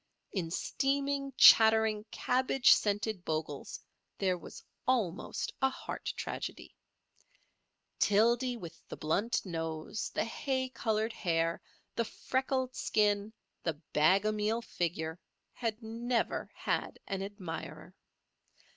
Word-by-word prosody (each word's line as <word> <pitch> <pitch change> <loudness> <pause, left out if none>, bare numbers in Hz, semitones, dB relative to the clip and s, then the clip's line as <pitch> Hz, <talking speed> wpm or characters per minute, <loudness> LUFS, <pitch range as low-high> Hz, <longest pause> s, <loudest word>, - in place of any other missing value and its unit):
In 175 -5 -2
steaming, 275 - 0
chattering, 220 -1 +7
cabbage 260 0 +4
scented 205 -2 0
Bogle's 155 -3 -3 0.4
there 185 -2 +1
was 175 - -10 0.2
almost 215 -9 0
a 265 - +4
heart 265 - -5
tragedy. - - -5 1.2
Tildy 235 +4 +3
with 170 -7 -9
the - - -6
blunt 200 +11 0
nose, 165 +3 -3
the - - +1
hay 260 +2 -2
coloured 220 -2 -1
hair, 165 -4 0 0.3
the 230 - +1
freckled 260 +2 -1
skin, 205 0 +1 0.3
the 165 - -1 0.2
bag 185 +7 +4
o' 215 - +3
meal 215 +2 0
figure, 160 -3 -2 0.3
had 230 -1 -3
never 230 +2 -1
had - - -2
an 195 -1 -3
admirer. 195 -4 -6
215 Hz, 110 wpm, -32 LUFS, 180-240 Hz, 1.2 s, chattering